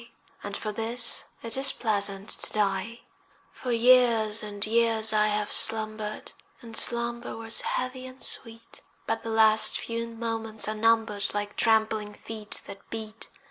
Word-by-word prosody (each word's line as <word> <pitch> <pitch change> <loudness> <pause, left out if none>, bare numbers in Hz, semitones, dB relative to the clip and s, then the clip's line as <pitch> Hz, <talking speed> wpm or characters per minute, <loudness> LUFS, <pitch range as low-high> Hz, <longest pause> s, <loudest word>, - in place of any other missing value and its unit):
And - - -4
for 215 - -4
this 230 +3 +2 0.2
it 230 -1 +1
is 270 0 +3
pleasant 200 -3 -1
to - - 0
die. 210 +2 -1 0.5
For 250 - -6
years 230 -2 +4
and 205 -1 -1
years 225 -1 +3
I 215 0 +3
have 210 0 -2
slumbered, 215 -1 +1 0.3
And 230 -1 -9
slumber 235 0 0
was 225 0 +3
heavy 255 0 -4
and 260 +1 -13
sweet, 230 -1 -2 0.2
But - - -2
the 230 - -7
last 220 -1 +4
few 230 0 -4
moments 225 -1 -3
are 215 - -1
numbered 225 -1 +1
Like 205 0 -3
trampling 220 -2 +1
feet 215 -2 -6
that 195 - -12
beat. 220 0 -8
225 Hz, 145 wpm, -26 LUFS, 215-230 Hz, 0.5 s, years